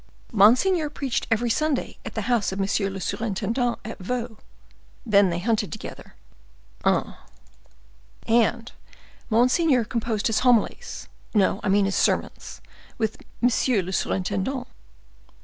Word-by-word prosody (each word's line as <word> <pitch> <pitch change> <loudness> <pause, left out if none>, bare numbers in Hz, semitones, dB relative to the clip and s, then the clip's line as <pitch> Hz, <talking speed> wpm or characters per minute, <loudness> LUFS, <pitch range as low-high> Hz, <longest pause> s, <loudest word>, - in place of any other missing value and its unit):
"Monseigneur 260 - +4
preached 275 -3 -3
every 230 +1 +1
Sunday 305 +1 -1
at 225 - -8
the 220 - -1
house 235 -3 +1
of 190 - -5
monsieur 195 0 0
le 195 0 -6
surintendant 230 +5 -1
at 225 - -7
Vaux; 235 +3 -4 0.6
then 200 -4 +4
they 170 - -2
hunted 210 +2 0
together." 215 - -9 0.7
"Ah!" - - 0 1.1
"And 230 +1 +2 0.6
monseigneur 255 +4 +3
composed 225 -2 -2
his 225 -2 +2
homilies—no, 235 - 0
I - - -1
mean 200 +1 +4
his 195 - -1
sermons—with 220 -2 -2 0.3
monsieur 245 -3 +2
le 185 - -6
surintendant." 200 +9 -1
225 Hz, 115 wpm, -24 LUFS, 200-245 Hz, 1.1 s, Monseigneur